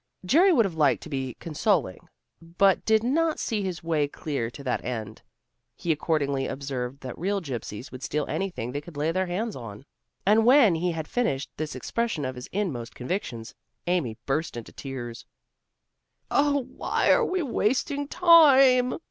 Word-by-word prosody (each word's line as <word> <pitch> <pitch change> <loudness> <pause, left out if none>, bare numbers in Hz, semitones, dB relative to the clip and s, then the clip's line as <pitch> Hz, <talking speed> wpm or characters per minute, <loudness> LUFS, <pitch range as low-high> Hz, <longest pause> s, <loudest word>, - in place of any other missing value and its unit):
Jerry 340 - +5
would 235 -10 +4
have 190 - -3
liked 150 -3 +2
to - - -9
be 130 -4 -3
consoling, 160 - -1 0.3
but 175 +4 +2
did 220 0 +3
not 315 +6 +1
see 220 -3 -1
his 185 -4 -4
way 155 -3 +1
clear 140 -5 -4
to 140 +4 -11
that 130 - -2
end. 110 -3 -5 0.5
He 170 - -2
accordingly 145 -3 0
observed 135 -1 -5
that 130 -2 -6
real 200 +4 0
gypsies 125 - -6
would 130 - -9
steal 150 +1 -2
anything 175 -12 -3
they 145 +2 -4
could 155 0 -12
lay 155 +3 +1
their 185 +2 -1
hands 210 +5 -3
on. 115 0 -9 0.4
And 215 +3 +5
when 245 -5 +6
he 170 +1 -1
had 160 -1 -5
finished 140 - -1
this 155 -2 -4
expression 195 - -2
of 130 - -3
his 125 0 -9
inmost 155 - -3
convictions, 125 - -4 0.3
Amy 170 -11 -1
burst 150 -1 -1
into 115 - -8
tears. 120 -4 -7 1.0
"Oh, 285 -1 +2
why 260 - 0
are - - +4
we 370 -5 0
wasting 280 +3 0
time?" 275 -7 +6
165 Hz, 165 wpm, -26 LUFS, 135-225 Hz, 1.0 s, when